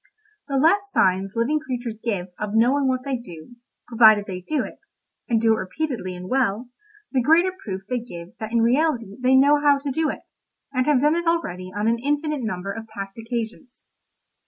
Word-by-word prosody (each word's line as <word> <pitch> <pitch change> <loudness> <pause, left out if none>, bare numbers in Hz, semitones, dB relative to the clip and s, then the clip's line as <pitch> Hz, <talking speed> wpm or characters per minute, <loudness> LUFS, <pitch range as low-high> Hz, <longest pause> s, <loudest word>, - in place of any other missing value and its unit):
The 275 -2 -1
less 395 +8 +3
signs 190 +1 +2
living 250 +7 +1
creatures 245 -5 -5
give 195 -6 -2
of 210 0 -3
knowing 260 +5 +3
what 255 -1 0
they 270 -2 -1
do, 205 0 -12 0.3
provided 220 -3 +6
they 185 -2 -6
do 280 +7 -1
it, - - -10 0.5
and 230 -2 +3
do 225 0 +4
it - - 0
repeatedly 190 -2 -4
and 180 +1 -8
well, 240 -1 0 0.4
the 260 - +2
greater 330 +8 +4
proof 195 - -7
they 250 +2 -1
give 175 -8 -9
that 220 0 -5
in 230 -1 +2
reality 240 -4 +1
they 255 +1 +4
know 285 +2 +5
how 290 -1 +5
to 280 0 -4
do 315 +3 0
it, - - -8 0.4
and 255 +1 0
have 290 -4 +3
done 300 +2 +4
it 340 0 -2
already 185 - -1
on 205 +3 -2
an 230 +1 +2
infinite 295 +2 -1
number 195 -4 -3
of 225 +1 -7
past 195 -1 -8
occasions. 235 +2 -6
240 Hz, 195 wpm, -23 LUFS, 210-280 Hz, 0.5 s, provided